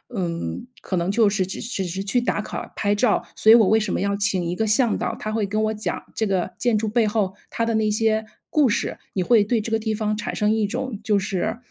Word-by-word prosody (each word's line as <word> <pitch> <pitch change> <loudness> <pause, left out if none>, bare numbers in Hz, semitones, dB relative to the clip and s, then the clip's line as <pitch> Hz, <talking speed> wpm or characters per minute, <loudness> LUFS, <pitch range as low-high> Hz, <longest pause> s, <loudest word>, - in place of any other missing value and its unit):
嗯， 170 - -3 0.2
可 190 - -3
能 175 +1 0
就 220 0 +4
是 195 -2 0
只 190 - -6
只 215 -4 -3
是 185 +2 -4
去 225 +5 +1
打 240 - 0
卡、 - - -6
拍 205 -1 +1
照。 210 +1 +2
所 220 - +5
以 - - +10
我 220 -4 +5
为 220 +2 +4
什 210 -3 -2
么 - - 0
要 200 +1 0
请 200 -3 0
一 175 +1 -2
个 220 - 0
向 220 +2 +2
导， - - -2
他 215 - -4
会 215 -1 0
跟 215 +2 -1
我 215 0 0
讲 215 0 -3
这 220 - 0
个 190 -3 -1
建 240 -3 +2
筑 220 +1 -1
背 225 +1 +2
后 205 -3 0
它 230 - -1
的 230 - 0
那 220 -1 +2
些 220 0 +1 0.2
故 290 -5 +3
事。 - - -1 0.2
你 185 - 0
会 220 +2 +5
对 225 +3 +1
这 220 +1 -5
个 225 - +2
地 220 0 -2
方 215 0 -1
产 210 - -4
生 210 0 +2
一 220 -1 +1
种 220 +1 -4
就 210 -2 +2
是 200 +4 -2
215 Hz, 280 characters per minute, -23 LUFS, 195-220 Hz, 0.2 s, 以